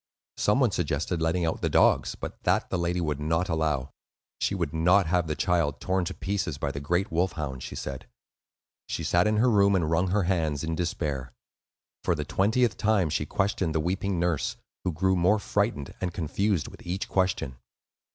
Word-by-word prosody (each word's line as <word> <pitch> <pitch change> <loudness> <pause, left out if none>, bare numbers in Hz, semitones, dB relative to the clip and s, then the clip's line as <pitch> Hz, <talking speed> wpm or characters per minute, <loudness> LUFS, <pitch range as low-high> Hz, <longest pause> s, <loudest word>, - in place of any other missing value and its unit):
Some - - +2
one - - +3
suggested 80 +4 -1
letting 85 +2 +1
out 80 - -2
the - - +1
dogs; - - +3
but - - -7
that, - - +1
the 90 - 0
lady 85 +1 0
would 75 -4 -1
not 80 +4 0
allow. 75 -5 0 0.5
She 100 - 0
would 85 -6 -2
not 90 +4 +4
have 85 0 +1
the 75 - -1
child 85 -6 +1
torn 95 -1 0
to - - -4
pieces 95 -7 -2
by 70 0 -2
the 70 - -5
great 90 +7 0
wolf 85 +2 +1
hounds, 70 -6 -4
she - - -6
said. 65 -1 -6 0.8
She - - -3
sat 85 +3 +3
in 105 0 +2
her 120 +4 +4
room 100 -4 +4
and 80 -4 +1
wrung 90 +3 +2
her 100 +2 +1
hands 80 -5 0
in 80 +1 -2
despair. 75 -6 -2 0.7
For 85 - +2
the 75 -1 -3
twentieth 110 - +2
time 100 -7 +2
she - - -1
questioned 95 -4 0
the - - +3
weeping 95 +3 -1
nurse, 85 -4 0 0.3
who 90 - 0
grew 95 +4 +1
more 90 +4 +4
frightened 100 - -1
and 90 -2 -1
confused 90 +2 0
with - - -12
each 90 +3 -3
question. 95 -9 0
85 Hz, 195 wpm, -27 LUFS, 80-95 Hz, 0.8 s, not